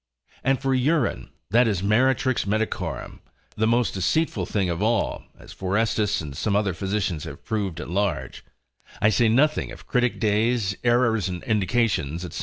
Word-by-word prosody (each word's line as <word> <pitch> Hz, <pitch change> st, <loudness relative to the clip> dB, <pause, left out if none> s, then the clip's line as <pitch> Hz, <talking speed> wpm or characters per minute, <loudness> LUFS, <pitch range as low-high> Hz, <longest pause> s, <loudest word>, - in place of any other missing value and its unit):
And 135 Hz, -1 st, +2 dB
for 135 Hz, 0 st, 0 dB
urine, 130 Hz, +1 st, +1 dB, 0.2 s
that 120 Hz, +2 st, +5 dB
is 100 Hz, -4 st, -1 dB
meretrix 130 Hz, +3 st, +2 dB
medicorum, 110 Hz, +2 st, -2 dB, 0.4 s
the 110 Hz, +1 st, +1 dB
most 120 Hz, +1 st, +2 dB
deceitful 95 Hz, -, 0 dB
thing 100 Hz, -3 st, 0 dB
of 85 Hz, +1 st, -2 dB
all, 115 Hz, +2 st, 0 dB
as -, -, -13 dB
Forestus 105 Hz, +1 st, 0 dB
and 75 Hz, -3 st, -7 dB
some 100 Hz, +7 st, -1 dB
other 100 Hz, -2 st, +1 dB
physicians 95 Hz, -2 st, -2 dB
have -, -, -10 dB
proved 100 Hz, -6 st, -2 dB
at -, -, -6 dB
large: 100 Hz, +3 st, -2 dB, 0.6 s
I 105 Hz, -, +4 dB
say 115 Hz, +1 st, +3 dB
nothing 145 Hz, +7 st, +2 dB
of -, -, -11 dB
critic 125 Hz, -1 st, 0 dB
days, 110 Hz, -1 st, +1 dB
errors 115 Hz, -5 st, +2 dB
in 90 Hz, -1 st, -5 dB
indications, 100 Hz, -, 0 dB
&c. -, -, -5 dB
110 Hz, 160 wpm, -24 LUFS, 95-120 Hz, 0.6 s, that